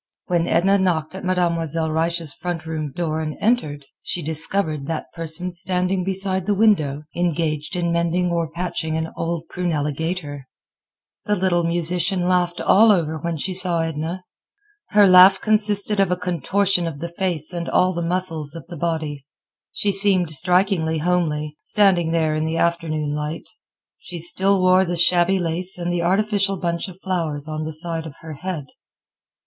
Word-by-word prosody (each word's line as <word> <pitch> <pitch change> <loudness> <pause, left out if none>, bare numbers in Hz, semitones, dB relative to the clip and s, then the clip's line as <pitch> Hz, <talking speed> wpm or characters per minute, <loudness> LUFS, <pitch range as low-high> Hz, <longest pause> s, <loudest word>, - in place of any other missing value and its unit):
When 175 -1 0
Edna 195 +4 +3
knocked 170 -4 0
at 190 - -8
Mademoiselle 165 -3 0
Reisz's 165 -1 0
front 175 -2 -5
room 155 -2 -4
door 160 -1 -2
and 155 -1 -4
entered, 155 - 0 0.2
she 175 - -4
discovered 155 -1 -1
that 165 -1 -5
person 165 +2 -3
standing 185 +1 -1
beside 190 0 -1
the 205 - +2
window, 155 -10 +2
engaged 165 -2 -1
in 170 -1 -1
mending 170 +1 0
or 170 -2 -1
patching 170 -1 -3
an 160 0 -3
old 165 -1 -3
prunella 155 -5 -2
gaiter. 150 -4 -4 0.8
The 210 - +1
little 180 -2 +1
musician 175 +2 0
laughed 175 -1 +1
all 220 +2 +5
over 160 -5 0
when 170 +1 -3
she 185 +5 -3
saw 180 -2 +1
Edna. 165 +3 -4 0.7
Her 205 0 +5
laugh 185 +1 +8
consisted 210 -1 +4
of 195 -2 +3
a 180 - 0
contortion 180 +1 0
of 160 -4 -5
the 170 +4 -5
face 175 -2 -2
and 170 -1 -4
all 185 +1 +2
the 170 - -3
muscles 165 -3 -1
of 165 - -9
the 170 - -7
body. 155 -4 -3 0.4
She 205 - 0
seemed 195 -4 +2
strikingly 180 0 +2
homely, 155 -3 -1
standing 185 -6 +2
there 160 -2 +1
in 155 0 -1
the 160 +1 -2
afternoon 160 -4 -1
light. 150 +1 -4 0.5
She 175 - -8
still 190 +3 +2
wore 185 +1 +5
the 175 -1 -2
shabby 175 +2 +3
lace 180 +2 0
and 175 0 -2
the 175 - 0
artificial 195 +2 +1
bunch 170 0 -2
of 185 -2 -11
violets 160 -6 -2
on 155 0 -4
the 155 - -4
side 165 0 -4
of 145 - -11
her 160 -1 -8
head. 160 0 -5
170 Hz, 165 wpm, -21 LUFS, 160-185 Hz, 0.8 s, laugh